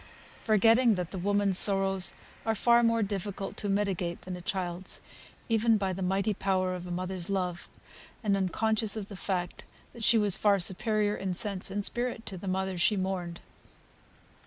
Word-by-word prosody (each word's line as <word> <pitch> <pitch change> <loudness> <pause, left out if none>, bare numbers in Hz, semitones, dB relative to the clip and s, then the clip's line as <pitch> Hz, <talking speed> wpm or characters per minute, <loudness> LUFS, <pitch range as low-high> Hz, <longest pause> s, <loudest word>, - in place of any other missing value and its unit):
Forgetting 225 +2 +4
that 180 -1 -4
the 190 - -4
woman's 200 0 +2
sorrows 195 -2 +2 0.3
are 225 0 0
far 235 +2 +4
more 230 -1 +2
difficult 200 -1 -4
to 205 - -2
mitigate 195 -4 -1
than 185 -1 -5
a 180 - -8
child's, 180 0 -3 0.5
even 225 0 +3
by 195 -2 -1
the 190 - -6
mighty 195 +3 0
power 185 -2 0
of 180 0 -6
a - - -6
mother's 185 0 -4
love; 180 -3 -2 0.5
and 205 -2 +2
unconscious 215 +3 0
of 205 -2 -6
the 200 - -7
fact, 180 -2 -3 0.3
that 235 - -8
she 230 - +5
was 205 -3 +5
far 200 0 +3
superior 210 +3 +1
in 190 -2 -3
sense 195 -1 +1
and 200 +1 -2
spirit 240 -2 -2
to 195 - -6
the 185 +2 -8
mother 190 -1 -2
she 210 +4 +3
mourned. 185 -2 -3
195 Hz, 175 wpm, -29 LUFS, 185-210 Hz, 0.5 s, she